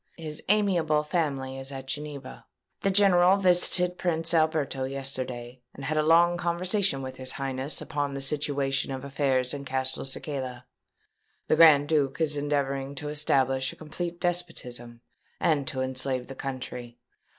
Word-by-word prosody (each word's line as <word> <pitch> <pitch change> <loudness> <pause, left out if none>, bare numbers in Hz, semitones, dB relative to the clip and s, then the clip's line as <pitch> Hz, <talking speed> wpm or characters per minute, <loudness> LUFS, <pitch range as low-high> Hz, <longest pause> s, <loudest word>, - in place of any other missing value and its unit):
His 155 -2 -2
amiable 175 -8 +3
family 140 -5 -2
is 135 +1 -5
at 135 -1 -7
Geneva. 145 -2 -7 0.3
The 195 - +2
general 190 -1 +5
visited 180 -1 +2
Prince 165 -2 0
Alberto 155 -5 +1
yesterday, 130 -2 -5
and 140 - -7
had 155 - -1
a 155 - +3
long 170 +3 +5
conversation 175 -3 0
with 130 0 -7
his 130 0 -3
Highness 135 +1 -2
upon 145 -1 -2
the - - -3
situation 140 -1 0
of 135 0 -5
affairs 135 -2 0
in 140 -1 -5
Castelcicala. 130 -1 -3 0.8
The - - +4
Grand 155 -3 +7
Duke 145 -3 +1
is 155 -2 +1
endeavouring 140 -1 -1
to 150 +1 -5
establish 135 -3 +1
a - - -13
complete 170 +2 -5
despotism, 125 -10 -3 0.4
and 145 -5 +1
to 130 -3 -2
enslave 130 -1 -1
the 135 - -8
country. 125 -3 -6
140 Hz, 145 wpm, -27 LUFS, 130-165 Hz, 0.8 s, Grand